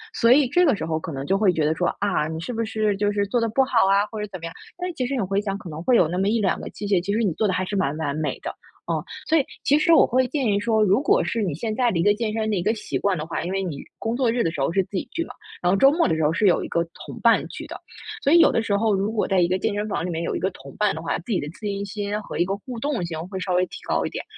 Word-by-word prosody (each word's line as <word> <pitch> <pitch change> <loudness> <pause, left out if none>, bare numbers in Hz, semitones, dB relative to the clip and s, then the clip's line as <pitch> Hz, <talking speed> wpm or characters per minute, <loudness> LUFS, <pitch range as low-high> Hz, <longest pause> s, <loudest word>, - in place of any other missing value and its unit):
所 230 - +4
以 270 +1 +6
这 355 +8 +3
个 280 -8 +4
时 - - -5
候 160 -1 -1
可 160 - -6
能 135 -2 -4
就 195 - +2
会 195 -3 +3
觉 160 - 0
得 155 +1 +1
说， 175 +2 0
啊， 195 -7 0
你 160 0 -5
是 165 +9 -5
不 230 0 -1
是 215 -2 0
就 205 0 +1
是 205 0 0
做 240 +5 +1
得 230 - +1
不 265 +5 +3
好 240 -6 +3
啊， 200 +1 +4
或 220 - -6
者 - - -2
是 - - -13
怎 185 - -6
么 165 - -7
样， 165 - -6 0.2
但 360 +1 -3
其 255 - -1
实 250 - -4
你 250 - 0
回 195 0 0
想 200 -2 -3
可 180 - -10
能 155 0 -6
会 250 - +3
有 170 - +4
那 175 +3 -3
么 195 +1 +1
1-2 215 -3 +1
个 - - -6
器 205 - -6
械 195 -3 +2
其 200 - -2
实 220 - +1
你 205 -7 +1
做 215 - 0
得 190 - 0
还 185 +1 0
是 200 - -4
蛮 145 -7 0
完 145 -3 -2
美 155 -1 -2
的， - - -5 0.4
啊。 - - -2 0.2
所 325 - +4
以 290 - +3 0.2
其 290 - +4
实 335 +2 +3
我 - - +7
会 255 +2 +2
建 275 0 -2
议 200 -1 +2
说， 220 +1 +1
如 205 +5 +3
果 - - +4
是 230 - -1
你 180 -6 -1
现 215 +9 -3
在 245 -1 +2
的 170 - -1
一 - - +2
个 205 - +5
健 220 0 -2
身 220 -1 -1
的 210 - +1
一 175 - -1
个 215 +4 +2
习 220 - -4
惯 200 -2 +1
的 155 - -4
话， 165 - -3
因 175 - -3
为 195 0 -1
你， 155 -7 -5 0.2
工 225 +1 -2
作 245 -2 +2
日 240 +1 0
的 - - +1
时 160 - -7
候 135 - +1
是 195 - +2
自 - - -35
己 - - -1
去 335 - -2
嘛， 250 - -10 0.3
然 175 - +2
后 - - +4
周 270 +6 +6
末 330 +3 +2
的 165 - +1
时 160 - -1
候 150 - +3
是 205 +4 +2
有 180 - +3
一 - - -5
个 170 - +1 0.2
同 - - -9
伴 - - +4
去 - - -8
的。 - - -8 0.5
所 280 - +3
以 340 - +8
有 - - +6
的 - - +2
时 210 -3 0
候 215 0 +2
如 200 +3 -1
果 220 -2 0
在 190 -2 +2
一 170 - +3
个 185 - +1
健 210 - -1
身 205 +1 -1
房 185 - -2
里 - - -3
面 165 -1 -3
有 - - -2
一 - - -1
个 190 - 0
同 140 -5 -13
伴 210 -2 +1
的 160 - -6
话， 165 - -1
自 180 +8 -8
己 185 - +1
的 145 - -5
自 165 - -15
信 200 0 -3
心 205 +1 -3
和 - - -7
一 175 - +3
个 195 +2 -2
互 235 +4 -8
动 275 -6 -1
性 165 -2 -5
会 190 0 -6
稍 185 - -1
微 180 +1 +3
提 - - -9
高 - - +1
一 - - -2
点。 - - -5
200 Hz, 385 characters per minute, -23 LUFS, 175-230 Hz, 0.5 s, 以